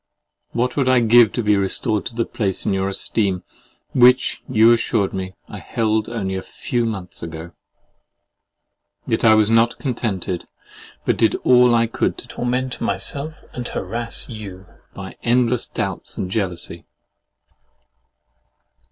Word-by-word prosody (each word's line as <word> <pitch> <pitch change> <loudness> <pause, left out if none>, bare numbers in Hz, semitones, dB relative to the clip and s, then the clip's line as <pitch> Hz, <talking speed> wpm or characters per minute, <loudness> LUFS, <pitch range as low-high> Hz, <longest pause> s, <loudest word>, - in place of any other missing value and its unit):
What 125 +1 -1
would 135 -3 +2
I 130 -1 +5
give 115 -1 +6
to 120 - -1
be 105 0 +4
restored 100 +2 0
to 120 - -7
the 115 -1 0
place 100 -5 -2
in - - +1
your 95 0 0
esteem, 95 -1 -1 0.5
which, 125 +1 +4
you 115 -1 +6
assured 115 -3 0
me, 95 -1 -5
I - - -8
held 110 -1 -1
only 100 -5 -3
a 95 - -2
few 120 +3 -2
months 95 -5 -6
ago! 80 +1 -7 1.5
Yet - - -1
I 110 -1 +7
was 110 0 +3
not 115 +1 +3
contented, 105 - -3 0.6
but - - +1
did - - +3
all 125 -1 +6
I 115 0 +4
could 115 - -1
to - - -10
torment 125 +1 -2
myself 150 +2 -3
and 125 -1 -5
harass 115 +5 -4
you 100 -5 -8 0.3
by - - -8
endless 120 0 +2
doubts - - -4
and 90 - -3
jealousy. 95 -5 -3
115 Hz, 145 wpm, -21 LUFS, 95-120 Hz, 1.5 s, I